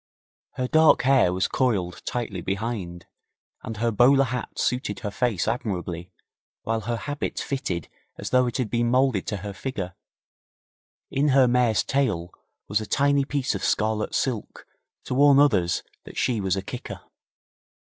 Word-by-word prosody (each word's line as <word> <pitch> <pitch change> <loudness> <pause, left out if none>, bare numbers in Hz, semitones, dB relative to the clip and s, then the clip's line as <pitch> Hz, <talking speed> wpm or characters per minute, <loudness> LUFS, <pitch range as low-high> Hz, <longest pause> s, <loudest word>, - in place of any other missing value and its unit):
Her 125 - -2
dark 160 +3 +5
hair 130 -8 +4
was 95 +1 0
coiled 100 -9 -1
tightly 115 -7 -3
behind, 95 -3 -4 0.6
and 110 - -6
her 115 +1 +1
bowler 130 +5 +5
hat 125 -2 -4
suited 125 -3 -1
her 105 -3 -3
face 110 -5 0
admirably 90 -6 -3 0.5
while 115 0 -1
her 120 +3 -2
habit 145 +5 -4
fitted 115 - -3 0.3
as - - -6
though 125 -1 +4
it 120 - -2
had 125 -6 -2
been 120 0 +1
moulded 125 -5 +2
to 105 - -2
her 100 - -5
figure. 95 -3 -5 1.2
In 140 +2 +1
her 135 -2 +5
mare's 120 -3 +3
tail 100 -11 -1 0.3
was 105 +2 0
a 110 - -6
tiny 140 0 +2
piece 140 -2 -1
of - - -4
scarlet 110 0 0
silk 120 -6 -2 0.4
to - - -4
warn 140 +1 +6
others 95 -12 +3 0.2
that - - -11
she 115 -4 +1
was 95 -1 +1
a 95 - -3
kicker. - - -7
120 Hz, 155 wpm, -25 LUFS, 100-130 Hz, 1.2 s, warn